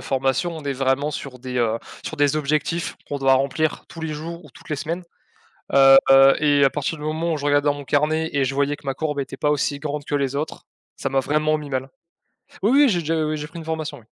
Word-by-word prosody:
formation, 135 +6 -1
on 155 - -8
est 140 - -1
vraiment 135 +2 0
sur 135 -3 -7
des, 125 0 -6
heu, 115 -1 +1 0.3
sur 160 - -5
des 145 0 +2
objectifs 155 +3 -1
qu'on 145 - -3
doit 135 -1 +4
remplir 140 +4 0
tous 165 - -10
les 160 -1 -3
jours 170 +3 -7
ou 150 - -15
toutes - - -17
les 150 - -1
semaines. 165 +5 -4 0.7
Heu 135 0 +8
heu 135 0 +7
et 145 -2 +4
à - - +5
partir 150 +2 -2
du 150 - -9
moment 160 +2 -1
où, 155 - -1
je 145 - -6
regardais 145 0 +3
dans 145 - +3
mon 145 - -8
carnet 155 +3 +1
et 140 -1 +2
je 135 +1 -3
voyais 140 +1 +1
que - - -20
ma 135 - 0
courbe 150 +1 -3
était 135 -1 -5
pas 150 - +1
aussi 145 0 -1
grande 145 0 -4
que 145 - -2
les 140 -1 -1
autres, 150 +3 -4 0.3
ça - - -2
m'a 135 0 +2
vraiment 155 +2 +1
mis 150 -1 -8
mal. 130 0 -3 0.7
Oui, 210 - +3
oui, 285 0 +6
j'ai 180 -6 +1
déjà 160 0 0
oui, 155 0 -2
j'ai 150 - -5
pris 170 +2 -10
une 160 - -9
formation, 160 -3 -4
oui. 115 - -21
145 Hz, 260 wpm, -22 LUFS, 135-155 Hz, 0.7 s, Heu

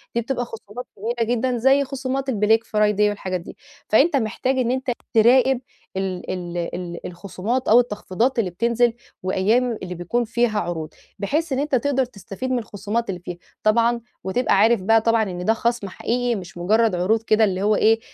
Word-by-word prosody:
دي 235 - +2
بتبقى 245 +1 -2
خصومات 225 +1 -9
كبيرة 230 +2 -2
جدًا 245 +1 0
زي 270 +4 +4
خصومات 270 0 -3
الBlack 220 0 +3
Friday 210 -2 +1
والحاجات 185 -3 -3
دي - - -11 0.3
فأنت 285 +9 +4
محتاج 255 +2 0
إن 245 -2 +1
أنت 260 0 -1 0.2
تراقب 250 +3 +5 0.4
ال 190 -2 -3
ال 175 -1 -5 0.2
ال 175 -1 -6
الخصومات 200 +7 -3
أو 230 - +7
التخفيضات 235 +1 0
اللي 200 -5 +1
بتنزل 235 +5 +1 0.3
وأيام 220 +6 +1
اللي 180 -1 -5
بيكون 175 +8 -1
فيها 230 -1 0
عروض 160 -5 -4 0.3
بحيث 300 +9 -1
إن 260 - 0
أنت 285 -1 0
تقدر 265 +1 +1
تستفيد 235 +2 -7
من 250 - +1
الخصومات 215 +1 -3
اللي 185 -2 -3
فيه 175 0 -7 0.3
طبعًا 235 +2 +3 0.2
وتبقى 215 +7 +1
عارف 220 +1 +4
بقى 225 +4 +4
طبعًا 230 0 +3
إن 180 -3 -5
ده 220 - +4
خصم 235 -3 -1
حقيقي، 240 +5 -1
مش 185 -3 -8
مجرد 215 +4 +2
عروض 200 +6 +1
كده 220 0 +3
اللي 190 -2 +1
هو 210 +1 +3
إيه 225 +2 +4
225 Hz, 180 wpm, -22 LUFS, 195-245 Hz, 0.4 s, أو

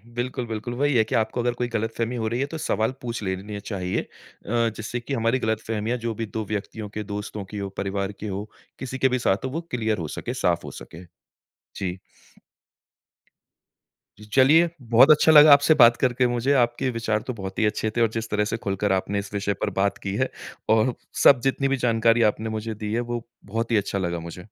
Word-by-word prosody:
बिल्कुल, 125 0 -3
बिल्कुल। 115 +2 -4
वही 140 +1 +1
है 110 - +5
कि - - -3
आपको 110 +2 0
अगर 120 0 0
कोई 125 0 -2
गलतफ़हमी 115 +1 -2
हो 110 -2 -2
रही 120 +3 -2
है 140 - +1
तो - - -3
सवाल 110 -5 0
पूछ 120 -2 -4
लेने 100 +2 -4
चाहिए। 95 -3 -3
अ, - - -14 0.7
जिससे 110 +3 -4
कि 135 +4 -6
हमारी 115 +1 +1
गलतफ़हमियाँ 110 +1 -2
जो 115 -1 -3
भी 115 - -3
2 110 0 -5
व्यक्तियों 105 +1 -5
के 105 +1 -5
दोस्तों 105 0 -6
की 105 +2 -8
हो, 100 -1 -4
परिवार 100 0 -2
की 105 +2 -8
हो, 100 +2 -5 0.3
किसी 130 0 -5
के 130 0 +3
भी 130 0 0
साथ 100 +1 0
हो - - -2
वो 160 +5 -3
क्लियर 110 -3 0
हो 80 -3 -4
सके, 120 +10 -5
साफ़ 85 -9 0
हो - - -7
सके। 85 +3 -11 0.7
जी। 90 -1 -4 2.2
जी 105 - -12
चलिए 155 +6 +6 0.2
बहुत 130 +6 +8
अच्छा 155 +1 +6
लगा 150 -1 +9
आपसे 145 +2 +5
बात 120 0 +7
करके 125 -1 +2
मुझे। 120 +3 +1
आपके 120 +2 -1
विचार 110 -2 -1
तो 125 - -2
बहुत 95 -3 -6
ही 110 - +3
अच्छे 110 +1 0
थे - - +3
और 115 - +4
जिस 115 0 -4
तरह 105 0 +1
से 115 +2 -2
खुलकर 100 -1 -1
आपने 100 +2 0
इस 100 +1 -8
विषय 100 0 -1
पर - - 0
बात 100 0 +1
की 100 0 -3
है। 130 +3 0 0.4
और 110 +3 +3 0.3
सब 130 -3 +8
जितनी 135 0 +1
भी 135 0 0
जानकारी 115 -1 +3
आपने 110 +1 -6
मुझे 110 0 -4
दी 105 0 -4
है, 120 - +1
वो 120 -1 -4 0.2
बहुत 115 +3 -3
ही 110 - +4
अच्छा 100 0 -1
लगा 85 -2 -2
मुझे। 85 +3 -9
110 Hz, 220 wpm, -24 LUFS, 105-120 Hz, 2.2 s, लगा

